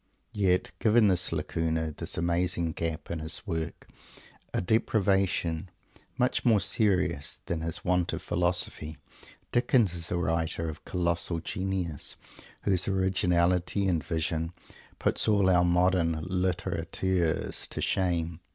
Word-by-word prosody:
Yet, 95 Hz, -3 st, +1 dB
given 110 Hz, -1 st, +4 dB
this 90 Hz, -1 st, +1 dB
"lacuna," 80 Hz, 0 st, -1 dB
this -, -, -2 dB
amazing 85 Hz, 0 st, +1 dB
"gap" 80 Hz, -1 st, -4 dB
in 85 Hz, -, -3 dB
his 80 Hz, +5 st, +3 dB
work, 80 Hz, -4 st, -4 dB, 0.6 s
a -, -, -1 dB
deprivation 95 Hz, -4 st, +1 dB, 0.5 s
much 125 Hz, 0 st, +1 dB
more 115 Hz, -4 st, +4 dB
serious 95 Hz, -, +1 dB
than 85 Hz, -2 st, -3 dB
his 80 Hz, +1 st, -4 dB
want 90 Hz, -1 st, +1 dB
of -, -, -5 dB
"philosophy," 85 Hz, -3 st, 0 dB, 0.5 s
Dickens 120 Hz, -5 st, +3 dB
is 85 Hz, -1 st, -3 dB
a 90 Hz, -, -1 dB
writer 80 Hz, -1 st, -1 dB
of 80 Hz, -1 st, -7 dB
colossal 85 Hz, -1 st, 0 dB
genius, 95 Hz, -3 st, -1 dB, 0.5 s
whose 95 Hz, -2 st, +2 dB
originality 90 Hz, 0 st, +1 dB
and 85 Hz, -5 st, +1 dB
vision 80 Hz, +2 st, -2 dB, 0.4 s
puts -, -, +1 dB
all 100 Hz, -3 st, +3 dB
our 90 Hz, -1 st, +4 dB
modern 85 Hz, -2 st, +2 dB
"literateurs" 90 Hz, -1 st, -1 dB
to -, -, -6 dB
shame. 85 Hz, -3 st, 0 dB
90 Hz, 125 wpm, -28 LUFS, 80-95 Hz, 0.6 s, given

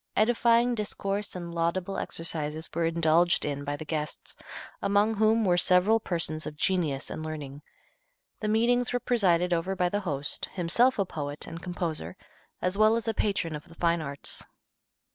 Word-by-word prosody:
Edifying 235 Hz, +2 st, +3 dB
discourse 205 Hz, -2 st, -3 dB
and 170 Hz, -1 st, -6 dB
laudable 175 Hz, +3 st, -1 dB
exercises 160 Hz, -1 st, -4 dB
were 170 Hz, 0 st, 0 dB
indulged 165 Hz, +1 st, +3 dB
in 145 Hz, -1 st, -3 dB
by 145 Hz, 0 st, -2 dB
the 155 Hz, -, -8 dB
guests, 150 Hz, -1 st, -4 dB, 0.5 s
among 205 Hz, +2 st, +3 dB
whom 220 Hz, +1 st, +3 dB
were 175 Hz, -2 st, +3 dB
several 185 Hz, +6 st, +4 dB
persons 165 Hz, -5 st, -2 dB
of 150 Hz, -, -7 dB
genius 155 Hz, -7 st, 0 dB
and 155 Hz, -, -5 dB
learning. 150 Hz, -3 st, -6 dB, 0.8 s
The 215 Hz, -, -2 dB
meetings 240 Hz, +3 st, +2 dB
were 245 Hz, -, +1 dB
presided 180 Hz, -8 st, +2 dB
over 175 Hz, +3 st, -1 dB
by 180 Hz, -1 st, +1 dB
the 205 Hz, -, -1 dB
host, 145 Hz, -7 st, -2 dB
himself 215 Hz, +9 st, +3 dB
a 200 Hz, -, +1 dB
poet 145 Hz, -4 st, -4 dB
and 165 Hz, -, -8 dB
composer, 165 Hz, -, -4 dB, 0.5 s
as 185 Hz, +3 st, 0 dB
well 215 Hz, +1 st, +6 dB
as 230 Hz, 0 st, -2 dB
a 225 Hz, -, +1 dB
patron 195 Hz, -7 st, 0 dB
of 150 Hz, -, -8 dB
the 165 Hz, -, -15 dB
fine 170 Hz, -1 st, +1 dB
arts. 140 Hz, -1 st, -4 dB
175 Hz, 165 wpm, -28 LUFS, 155-210 Hz, 0.8 s, well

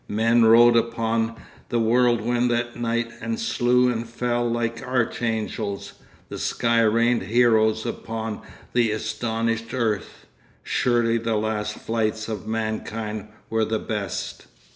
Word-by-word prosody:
Men 115 Hz, +2 st, +3 dB
rode 120 Hz, +1 st, +7 dB
upon 115 Hz, -1 st, 0 dB, 0.3 s
the 120 Hz, -, 0 dB
whirlwind 120 Hz, +1 st, +2 dB
that 120 Hz, 0 st, -1 dB
night 115 Hz, 0 st, -1 dB
and 230 Hz, 0 st, -3 dB
slew 125 Hz, -, +2 dB
and 115 Hz, -1 st, -4 dB
fell 120 Hz, 0 st, -1 dB
like 115 Hz, 0 st, -2 dB
archangels. 115 Hz, -4 st, -2 dB, 0.3 s
The -, -, -7 dB
sky 115 Hz, 0 st, +1 dB
rained 115 Hz, +2 st, +3 dB
heroes 110 Hz, +1 st, +3 dB
upon 110 Hz, -1 st, -4 dB, 0.3 s
the 120 Hz, -2 st, +3 dB
astonished 110 Hz, +2 st, -2 dB
earth. 110 Hz, -5 st, -2 dB, 0.4 s
Surely 120 Hz, -1 st, +1 dB
the 115 Hz, 0 st, -1 dB
last 105 Hz, 0 st, -1 dB
fights 110 Hz, -1 st, -2 dB
of 110 Hz, -3 st, -5 dB
mankind 110 Hz, -1 st, -3 dB, 0.2 s
were 110 Hz, 0 st, 0 dB
the 110 Hz, +1 st, 0 dB
best. 105 Hz, -4 st, -4 dB
115 Hz, 120 wpm, -24 LUFS, 110-120 Hz, 0.4 s, rode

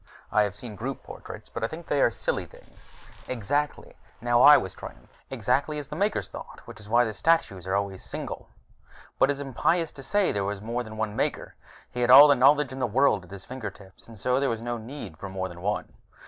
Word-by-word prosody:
I 105 Hz, -, +4 dB
have 105 Hz, -1 st, -1 dB
seen 110 Hz, 0 st, -9 dB
group 130 Hz, +6 st, -5 dB
portraits, -, -, -10 dB
but 115 Hz, -, -6 dB
I -, -, +2 dB
think 160 Hz, +6 st, -9 dB
they 145 Hz, -3 st, +1 dB
are -, -, +5 dB
silly -, -, -3 dB
things." -, -, -20 dB, 0.4 s
"Exactly." 145 Hz, +5 st, -2 dB, 0.3 s
Now 120 Hz, 0 st, +2 dB
I 145 Hz, +2 st, +10 dB
was 95 Hz, -, -4 dB
triumphant. -, -, -11 dB, 0.2 s
"Exactly 135 Hz, +5 st, 0 dB
as 145 Hz, -2 st, -6 dB
the -, -, -6 dB
Makers 200 Hz, +5 st, 0 dB
thought, -, -, -10 dB
which 115 Hz, -1 st, -11 dB
is 105 Hz, 0 st, -12 dB
why 120 Hz, +2 st, +4 dB
the 110 Hz, -, -3 dB
statues 100 Hz, -, +1 dB
are 95 Hz, -, 0 dB
always 100 Hz, -2 st, -2 dB
single -, -, -7 dB, 0.3 s
" -, -, -24 dB
"But 135 Hz, -, +5 dB
it -, -, +3 dB
is 140 Hz, -, -8 dB
impious 160 Hz, +5 st, 0 dB
to 140 Hz, -, -11 dB
say 200 Hz, +9 st, +1 dB
there 100 Hz, -, -1 dB
was 100 Hz, 0 st, -3 dB
more 115 Hz, +4 st, -3 dB
than 110 Hz, -2 st, -8 dB
one 110 Hz, -1 st, -2 dB
Maker! -, -, -2 dB, 0.4 s
He 125 Hz, -, -4 dB
had 120 Hz, -, +2 dB
all 140 Hz, +4 st, +11 dB
the 145 Hz, -, +6 dB
knowledge 140 Hz, +1 st, +4 dB
in 130 Hz, -, -7 dB
the 125 Hz, -, +1 dB
world 115 Hz, -4 st, +2 dB
at -, -, -19 dB
his 100 Hz, -1 st, -10 dB
fingertips, 100 Hz, -6 st, -9 dB
and 115 Hz, -1 st, -12 dB
so 125 Hz, +6 st, +1 dB
there 140 Hz, -, +1 dB
was 115 Hz, 0 st, -3 dB
no 120 Hz, 0 st, -3 dB
need 115 Hz, -, -8 dB
for 100 Hz, +2 st, -7 dB
more 95 Hz, 0 st, -3 dB
than 85 Hz, -1 st, -11 dB
one. 105 Hz, +3 st, -2 dB
120 Hz, 235 wpm, -26 LUFS, 105-140 Hz, 0.4 s, all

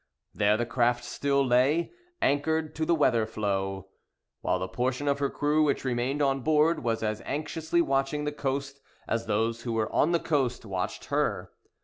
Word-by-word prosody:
There 105 Hz, +1 st, +3 dB
the 120 Hz, -, 0 dB
craft 120 Hz, 0 st, +1 dB
still 140 Hz, +2 st, 0 dB
lay, 130 Hz, +7 st, +2 dB, 0.3 s
anchored 155 Hz, +2 st, +1 dB
to 160 Hz, 0 st, -2 dB
the 170 Hz, -, +4 dB
weather 120 Hz, -7 st, +2 dB
floe, 95 Hz, -3 st, -2 dB, 0.5 s
while -, -, +1 dB
the 95 Hz, +1 st, -3 dB
portion 125 Hz, +8 st, -2 dB
of 140 Hz, 0 st, +1 dB
her 140 Hz, -1 st, +1 dB
crew 150 Hz, +1 st, +1 dB
which 140 Hz, -2 st, 0 dB
remained 130 Hz, +3 st, 0 dB
on 135 Hz, -1 st, +2 dB
board 155 Hz, +3 st, +2 dB
was 115 Hz, -1 st, -1 dB
as 110 Hz, -1 st, -2 dB
anxiously 160 Hz, +3 st, -1 dB
watching 135 Hz, +1 st, 0 dB
the 150 Hz, -, -1 dB
coast 140 Hz, -1 st, -3 dB, 0.3 s
as 115 Hz, 0 st, -1 dB
those 115 Hz, +2 st, 0 dB
who 120 Hz, -1 st, -3 dB
were 110 Hz, -1 st, -1 dB
on 160 Hz, -, +3 dB
the 170 Hz, -, +3 dB
coast 130 Hz, -7 st, -1 dB
watched 95 Hz, -3 st, -4 dB
her. -, -, 0 dB
135 Hz, 175 wpm, -28 LUFS, 115-150 Hz, 0.5 s, the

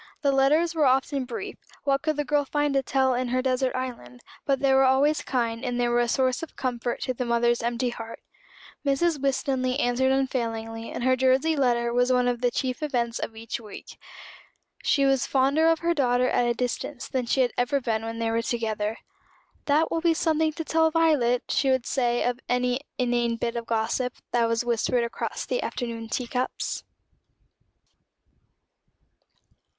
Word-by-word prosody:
The 280 Hz, -, +3 dB
letters 300 Hz, +5 st, +3 dB
were 310 Hz, -4 st, +3 dB
often 265 Hz, +1 st, +1 dB
brief 245 Hz, -, -6 dB, 0.3 s
what 275 Hz, -1 st, +1 dB
could 310 Hz, -1 st, 0 dB
the 295 Hz, 0 st, -2 dB
girl 295 Hz, 0 st, +2 dB
find 290 Hz, +1 st, 0 dB
to 275 Hz, -, +3 dB
tell 265 Hz, 0 st, +1 dB
in 250 Hz, +1 st, -1 dB
her 255 Hz, +1 st, 0 dB
desert 260 Hz, 0 st, 0 dB
island? 235 Hz, -, -6 dB, 0.3 s
but 275 Hz, -2 st, +2 dB
they 275 Hz, -1 st, +3 dB
were 265 Hz, 0 st, +5 dB
always 270 Hz, +4 st, +3 dB
kind, 230 Hz, -2 st, -2 dB
and 245 Hz, -2 st, -2 dB
they 240 Hz, -, +2 dB
were 240 Hz, 0 st, +2 dB
a 240 Hz, -, +2 dB
source 255 Hz, +1 st, +1 dB
of 330 Hz, -, -8 dB
comfort 240 Hz, -2 st, -3 dB
to 255 Hz, -, -1 dB
the 250 Hz, -, -3 dB
mother's 235 Hz, 0 st, +1 dB
empty 240 Hz, +1 st, -1 dB
heart. 230 Hz, -1 st, -8 dB, 0.6 s
Mrs. 290 Hz, +2 st, +1 dB
Winstanley 265 Hz, -1 st, 0 dB
answered 260 Hz, 0 st, +2 dB
unfailingly, 230 Hz, -4 st, -2 dB
and -, -, -4 dB
her 260 Hz, 0 st, +4 dB
Jersey 265 Hz, +5 st, +2 dB
letter 240 Hz, -4 st, +1 dB
was 245 Hz, +1 st, +2 dB
one 250 Hz, -1 st, +3 dB
of 245 Hz, -1 st, -1 dB
the 245 Hz, -, +3 dB
chief 255 Hz, +2 st, -3 dB
events 240 Hz, -6 st, -1 dB
of 225 Hz, -, -5 dB
each 225 Hz, +1 st, -5 dB
week. 215 Hz, -3 st, -11 dB, 0.8 s
She 280 Hz, -2 st, +2 dB
was 270 Hz, -2 st, +2 dB
fonder 275 Hz, +4 st, +3 dB
of 330 Hz, -1 st, +2 dB
her 340 Hz, 0 st, +2 dB
daughter 250 Hz, -4 st, +2 dB
at 245 Hz, -, +1 dB
a 240 Hz, -, +1 dB
distance 250 Hz, +2 st, -3 dB
than 255 Hz, -2 st, -2 dB
she 265 Hz, -, +2 dB
had 245 Hz, -2 st, +2 dB
ever 245 Hz, +3 st, +1 dB
been 225 Hz, -3 st, -2 dB
when 225 Hz, 0 st, -5 dB
they 230 Hz, 0 st, -1 dB
were 230 Hz, 0 st, +1 dB
together. 220 Hz, -2 st, -2 dB, 0.7 s
"That 305 Hz, +3 st, +2 dB
will 330 Hz, -, 0 dB
be 335 Hz, -1 st, +3 dB
something 315 Hz, -1 st, +1 dB
to 325 Hz, +1 st, -5 dB
tell 320 Hz, 0 st, +3 dB
Violet," 295 Hz, -7 st, +2 dB
she 270 Hz, -, +1 dB
would 260 Hz, -2 st, +1 dB
say 240 Hz, -2 st, 0 dB
of 245 Hz, 0 st, -1 dB
any 250 Hz, +1 st, +1 dB, 0.2 s
inane 240 Hz, -2 st, +1 dB
bit 235 Hz, +1 st, -3 dB
of 235 Hz, -1 st, -4 dB
gossip 235 Hz, +2 st, -1 dB, 0.2 s
that 235 Hz, -1 st, +2 dB
was 230 Hz, +1 st, 0 dB
whispered 240 Hz, +1 st, +1 dB
across 235 Hz, -, -4 dB
the -, -, -1 dB
afternoon 230 Hz, -2 st, -4 dB
tea 250 Hz, -, -2 dB
cups. 250 Hz, +1 st, -3 dB
255 Hz, 185 wpm, -26 LUFS, 235-275 Hz, 0.8 s, were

